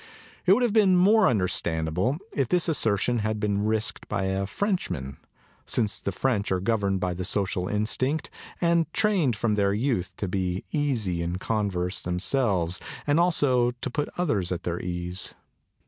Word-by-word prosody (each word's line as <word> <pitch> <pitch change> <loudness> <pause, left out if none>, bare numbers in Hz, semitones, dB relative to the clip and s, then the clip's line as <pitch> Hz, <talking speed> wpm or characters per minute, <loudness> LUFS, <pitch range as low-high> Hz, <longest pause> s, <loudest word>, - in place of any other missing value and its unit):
It - - +8
would 250 - +3
have 235 -4 +1
been 200 -4 +5
more 205 +5 +5
understandable 90 - 0 0.2
if 135 -3 0
this 180 +5 +1
assertion 120 - +1
had 110 0 -1
been 100 -1 0
risked 110 0 -1
by 95 - -1
a 95 +1 -1
Frenchman, 100 - -2 0.5
since 110 -4 0
the 100 - -2
French 105 0 0
are 95 - +2
governed 100 -1 0
by 90 -1 -1
the 90 +1 -4
social 95 -2 -1
instinct 130 +9 -1 0.3
and 170 -2 +2
trained 185 - +2
from 110 0 0
their 100 -1 +2
youth 115 -5 -1
up - - -43
to 100 - -2
be 90 -1 -2
easy 115 - 0
in 85 +1 -2
converse 95 -3 -1
themselves 90 -1 0 0.3
and 145 +2 +3
also 130 -8 +3
to 130 - -4
put 150 +3 -2
others 105 - 0
at 90 - -3
their 85 0 -2
ease. 90 +1 -4
105 Hz, 165 wpm, -26 LUFS, 90-140 Hz, 0.5 s, It